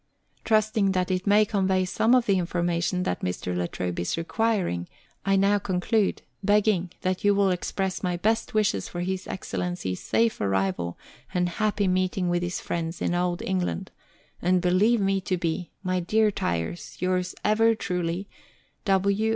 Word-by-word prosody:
Trusting 215 -2 +2
that 185 0 0
it 185 +2 -1
may 210 +1 +5
convey 190 -3 +1
some 225 +6 +3
of 250 -2 +3
the 195 -3 +3
information 175 +1 0
that 90 - -2
Mr. 90 0 -3
La 90 0 0
Trobe 90 -1 -4
is 85 - -1
requiring, 175 - 0 0.4
I 195 - +4
now 200 +1 +3
conclude, 195 +2 0 0.2
begging 205 -3 +3
that 185 0 -1
you 205 0 +4
will 200 -1 +3
express 185 +1 -2
my 180 -2 -1
best 220 +5 0
wishes 210 -1 +1
for 175 - -5
His 185 +1 -3
Excellency's 175 - -3
safe 230 -1 +1
arrival 95 -3 0 0.4
and 180 0 +2
happy 205 +2 0
meeting 185 0 +1
with 175 0 +1
his 175 0 -2
friends 165 0 -3
in - - 0
Old 175 0 0
England, 190 0 -2 0.5
and 180 +1 +3
believe 185 +6 +3
me 195 0 +1
to 185 0 -1
be, 170 0 -2
My 185 -1 0
dear 215 +4 +2
Tyers, 85 - -3
yours 180 0 0
ever 225 +2 +4
truly, 180 -1 -2 0.6
W. 200 +2 +2
185 Hz, 160 wpm, -26 LUFS, 175-205 Hz, 0.6 s, may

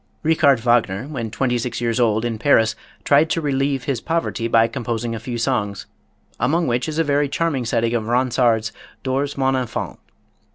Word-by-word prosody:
Richard 155 -5 +4
Wagner, 115 -4 +2
when 125 -7 -4
twenty 125 +2 -1
six 120 0 -3
years 115 +1 -1
old, 110 -1 +2
in 115 -2 -3
Paris, 115 -4 +3 0.3
tried 150 +3 +4
to 165 - 0
relieve 135 -3 -1
his 130 -4 -2
poverty 165 -8 -1
by 115 0 +4
composing 120 -2 -3
a 115 - -4
few 120 +1 -5
songs, 110 -5 -1 0.5
among 165 +7 +1
which 120 +2 -1
is 155 - -4
a 165 - +3
very 145 -1 +1
charming 145 -5 -1
setting 115 0 0
of 110 -2 -1
Ronsard's 120 -2 +1 0.3
"Dors 140 +2 -1
mon 135 0 +2
enfant." 125 -3 -4
125 Hz, 175 wpm, -21 LUFS, 115-140 Hz, 0.5 s, Richard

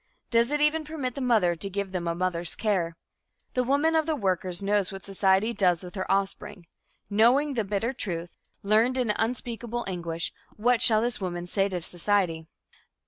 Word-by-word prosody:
Does 235 +1 +3
it 295 0 0
even 300 +2 +2
permit 300 -5 -4
the 275 - -5
mother 215 -9 +3
to 195 +4 -3
give 200 0 -3
them 180 -2 -3
a 170 - -1
mother's 175 -2 -1
care? 175 -6 -1 0.6
The 250 - +1
woman 285 +5 +2
of 315 -1 +2
the 315 - +1
workers 185 - -1
knows 205 0 +1
what 195 0 -8
society 195 +3 +2
does 180 -6 +2
with 180 - -9
her 190 -2 -3
offspring. 195 -1 -2 0.4
Knowing 245 +8 +3
the 230 -4 0
bitter 210 +5 -1
truth, 175 -7 -5 0.3
learned 220 +5 +3
in 245 -4 +2
unspeakable 235 +1 -3
anguish, 170 -3 -3 0.2
what 240 +2 +2
shall 220 -4 +6
this 240 -2 0
woman 175 -2 -3
say 195 +2 +1
to 185 -2 -2
society? 175 -2 -1
205 Hz, 180 wpm, -27 LUFS, 180-240 Hz, 0.6 s, shall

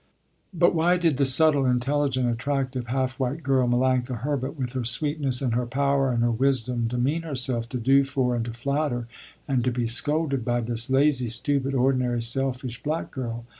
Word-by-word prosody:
But 175 -1 +2
why 175 +2 +2
did 165 -6 +1
the 140 -1 +2
subtle, 140 0 +4
intelligent, 130 +1 0
attractive, 130 +1 -2
half 130 +2 -2
white 135 +5 -2
girl 130 -2 +2
Melanctha 125 -1 0
Herbert, 140 +1 -3
with 125 -2 -4
her 130 -2 -2
sweetness 135 +2 0
and 125 -3 0
her 120 +1 -1
power 140 +1 +1
and 120 -1 0
her 120 - +2
wisdom, 125 -1 0
demean 125 +7 -1
herself 125 -6 -1
to 125 - -4
do 135 +4 +3
for 130 -2 -1
and 115 - -1
to 120 - -5
flatter 135 0 -2 0.4
and 130 -4 0
to 130 - +1
be 120 -1 -2
scolded, 140 +3 +1
by 120 0 0
this 115 +1 -1
lazy, 135 -2 +2
stupid, 135 +4 0
ordinary, 125 -2 +1
selfish 125 0 -1
black 155 +3 -3
girl. 120 -3 -5
130 Hz, 180 wpm, -25 LUFS, 120-140 Hz, 0.4 s, subtle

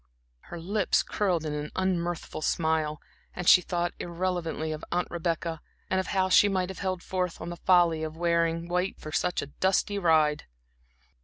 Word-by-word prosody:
Her 175 - -6
lips 195 +3 +1
curled 180 -6 0
in 150 - -2
an 150 0 -4
unmirthful 175 -4 -2
smile, 155 -1 0 0.4
as 180 -1 -5
she 180 - +8
thought 175 0 -2
irrelevantly 170 -2 -2
of 155 0 -5
Aunt 180 +1 0
Rebecca, 165 -1 -2 0.3
and 190 - +2
of 190 - -2
how 190 -1 +1
she 205 +2 +6
might 185 -2 0
have 190 - -7
held 185 -2 -2
forth 180 -2 -2
on 165 - -6
the 175 - -6
folly 175 -3 +3
of 160 0 -5
wearing 170 0 +1
white 180 +2 -1
for 155 - -8
such 180 +3 0
a 145 - -11
dusty 195 +2 +2
ride. 155 -4 +3
175 Hz, 175 wpm, -28 LUFS, 160-185 Hz, 0.4 s, she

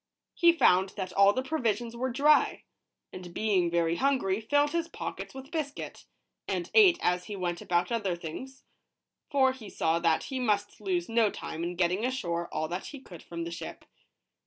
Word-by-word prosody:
He 340 -1 +5
found 190 - +3
that 185 -2 -4
all 200 0 +6
the 255 +5 -2
provisions 235 -5 -1
were 255 +2 -1
dry, 290 +4 +3 0.5
and 180 -1 -8
being 195 -5 +2
very 170 0 +1
hungry, 250 -8 +1
filled 290 +6 +2
his 335 -1 -1
pock - - -6
ets - - -8
with 265 +1 -9
biscuit, 300 -4 -5 0.4
and 180 -3 -3
ate 385 -5 +7
as 180 0 +1
he 210 - -6
went 175 -2 -3
about 175 +2 0
other 205 -6 0
things; 180 +12 -8 0.7
for 265 -2 +4
he 225 -6 -10
saw 165 -2 0
that 165 -2 +2
he 265 -2 -4
must 210 -4 -1
lose 180 -4 -1
no 225 -2 +3
time 165 -4 -6
in 175 +1 -3
getting 180 +4 +1
ashore 175 -10 -2
all 155 - -2
that 180 +2 -4
he 285 - -8
could 180 -10 -12
from 170 -1 -6
the 170 - -5
ship. 170 - -8
205 Hz, 185 wpm, -29 LUFS, 175-265 Hz, 0.7 s, ate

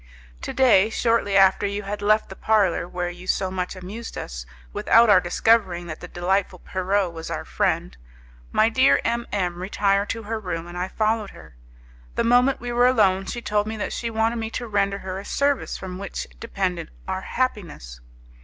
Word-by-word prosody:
To - - -4
day, 225 -6 +5
shortly 225 -3 +1
after 195 +1 +5
you 200 +1 -3
had 205 +1 -5
left 215 +1 +2
the 190 - -8
parlour, 200 -6 +2
where 175 0 -3
you 180 +1 -12
so 190 -1 0
much 180 0 -3
amused 200 +6 -8
us, - - -6 0.3
without 230 -1 +5
our 185 -3 +6
discovering 180 -1 +2
that 155 -2 -7
the 175 - -8
delightful 185 +3 -1
Pierrot 190 -1 -1
was 165 0 -7
our - - -4
friend, 60 - -1 0.6
my 220 - +4
dear 260 +4 +4
M 235 0 -1
M 180 -3 -2
retired 200 +1 +1
to 225 0 -3
her 220 +1 -3
room 180 -5 -4
and 175 0 -10
I 180 +1 -2
followed 215 +1 0
her. 80 -7 -15 0.6
The - - +1
moment 245 +3 +4
we 245 0 -5
were 245 +1 +4
alone 195 -6 +3
she 240 - -5
told 210 0 0
me 220 0 -4
that 210 - -3
she 235 - -3
wanted 225 +1 0
me 225 -1 -3
to 240 - -4
render 200 -2 0
her 190 -1 -5
a - - -8
service 280 +5 0
from 185 -1 -7
which 200 - -5
depended 185 -7 -3 0.2
our 190 0 -2
happiness. 175 - -3
200 Hz, 190 wpm, -23 LUFS, 180-225 Hz, 0.6 s, our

